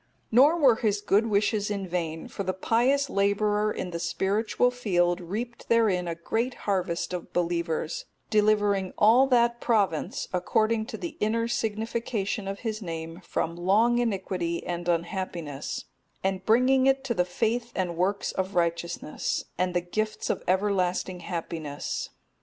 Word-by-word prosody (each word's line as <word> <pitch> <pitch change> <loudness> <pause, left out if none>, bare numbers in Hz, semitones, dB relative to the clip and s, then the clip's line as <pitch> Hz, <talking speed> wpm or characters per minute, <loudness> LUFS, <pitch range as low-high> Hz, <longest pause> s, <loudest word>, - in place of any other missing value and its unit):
Nor 280 +9 +6
were 265 -8 +5
his 210 -3 +1
good 210 +2 +2
wishes 205 0 +1
in 200 -2 -3
vain; 165 -2 -3
for - - -6
the 185 -1 -2
pious 250 +8 +2
labourer 210 0 +1
in 180 - -4
the 170 - -4
spiritual 210 +7 +1
field 180 -7 +1
reaped 225 +8 -5
therein 210 -6 +3
a 170 - -2
great 230 +9 -2
harvest 185 -3 -1
of 180 - -5
believers, 170 -2 -1 0.3
delivering 205 -3 +2
all 240 +6 +6
that 240 -2 +3
province 200 -9 0
(according 220 +5 +1
to 240 -4 -6
the 340 +5 -6
inner 230 +2 +1
signification 220 -2 -2
of 195 0 -5
his 220 -2 -3
name) 165 -1 -6
from 165 0 -2
long 215 +7 +3
iniquity 185 -6 -1
and 175 0 -3
unhappiness, 170 -4 -3 0.4
and 190 0 -1
bringing 260 +4 +4
it 270 0 +3
to 260 -3 -1
the 180 - +2
faith 230 +6 -1
and 180 -2 -1
works 190 +4 0
of 190 0 -3
righteousness, 170 -2 -1
and 180 0 -1
the 175 - +3
gifts 215 +5 -2
of - - -3
everlasting 185 -1 +1
happiness. 165 -4 -4
200 Hz, 145 wpm, -27 LUFS, 175-225 Hz, 0.4 s, Nor